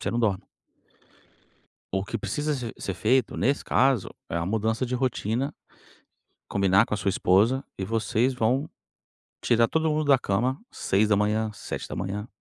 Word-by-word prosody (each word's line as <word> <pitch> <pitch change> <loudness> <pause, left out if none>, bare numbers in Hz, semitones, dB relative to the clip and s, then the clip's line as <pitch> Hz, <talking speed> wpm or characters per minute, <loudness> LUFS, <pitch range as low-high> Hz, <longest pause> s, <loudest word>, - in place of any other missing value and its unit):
você - - -2
não 120 - -1
dorme. 105 -5 +1 1.5
O 95 0 0
que 105 - -4
precisa 150 0 -2
ser 125 -4 -5
ser 95 - -4
feito, 120 +5 +1
nesse 140 +3 +1
caso, 130 -5 +2 0.2
é - - -3
uma 85 0 -1
mudança 110 +4 0
de 125 0 -3
rotina, 125 +1 -1 1.0
combinar 100 +1 +4
com - - -4
a - - 0
sua 100 0 0
esposa 105 +9 +3
e 95 - -3
vocês 115 +4 +1
vão 125 +5 0 0.7
tirar 115 -1 +3
todo 160 +3 +1
mundo 155 0 0
da 140 -2 +6
cama 125 +8 0
06:00, 105 +2 +1
07:00. 105 0 -5
110 Hz, 150 wpm, -26 LUFS, 100-130 Hz, 1.5 s, da